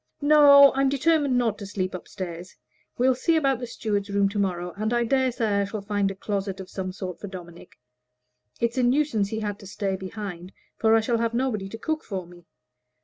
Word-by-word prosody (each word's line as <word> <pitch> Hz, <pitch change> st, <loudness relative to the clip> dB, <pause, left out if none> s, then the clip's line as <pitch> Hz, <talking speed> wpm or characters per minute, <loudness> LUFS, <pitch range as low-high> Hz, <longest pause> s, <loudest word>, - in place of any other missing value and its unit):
"No; 285 Hz, -2 st, +8 dB
I'm 270 Hz, 0 st, +2 dB
determined 285 Hz, -1 st, +2 dB
not 230 Hz, -4 st, 0 dB
to 200 Hz, -, -7 dB
sleep 185 Hz, -2 st, -3 dB
up 185 Hz, -, -7 dB
stairs. 175 Hz, -2 st, -7 dB, 0.4 s
We'll 255 Hz, +2 st, +4 dB
see 290 Hz, +6 st, +1 dB
about 275 Hz, -5 st, +2 dB
the 245 Hz, -, -5 dB
steward's 205 Hz, -3 st, -3 dB
room 200 Hz, 0 st, +2 dB
to 205 Hz, +1 st, -3 dB
morrow, 180 Hz, -3 st, -2 dB
and 215 Hz, +2 st, -2 dB
I 240 Hz, 0 st, +2 dB
dare 260 Hz, +2 st, +1 dB
say 215 Hz, -4 st, 0 dB
I -, -, 0 dB
shall 200 Hz, 0 st, -6 dB
find 205 Hz, -1 st, 0 dB
a 195 Hz, -, -6 dB
closet 195 Hz, -1 st, -3 dB
of 190 Hz, -, -9 dB
some 185 Hz, -1 st, -4 dB
sort 185 Hz, -2 st, -7 dB
for 205 Hz, -, -7 dB
Dominic. 175 Hz, -2 st, -11 dB, 0.8 s
It's 235 Hz, +2 st, 0 dB
a -, -, +2 dB
nuisance 245 Hz, -5 st, +1 dB
he 220 Hz, +1 st, -3 dB
had 205 Hz, -1 st, -3 dB
to 200 Hz, -, -11 dB
stay 200 Hz, -1 st, -2 dB
behind, 190 Hz, -2 st, -7 dB, 0.2 s
for 225 Hz, 0 st, +3 dB
I 225 Hz, -, +4 dB
shall 230 Hz, +1 st, 0 dB
have 230 Hz, 0 st, -1 dB
nobody 230 Hz, -6 st, -1 dB
to 225 Hz, -, -7 dB
cook 315 Hz, +7 st, -3 dB
for 190 Hz, -3 st, -5 dB
me. 175 Hz, 0 st, -17 dB
210 Hz, 215 wpm, -25 LUFS, 195-250 Hz, 0.8 s, No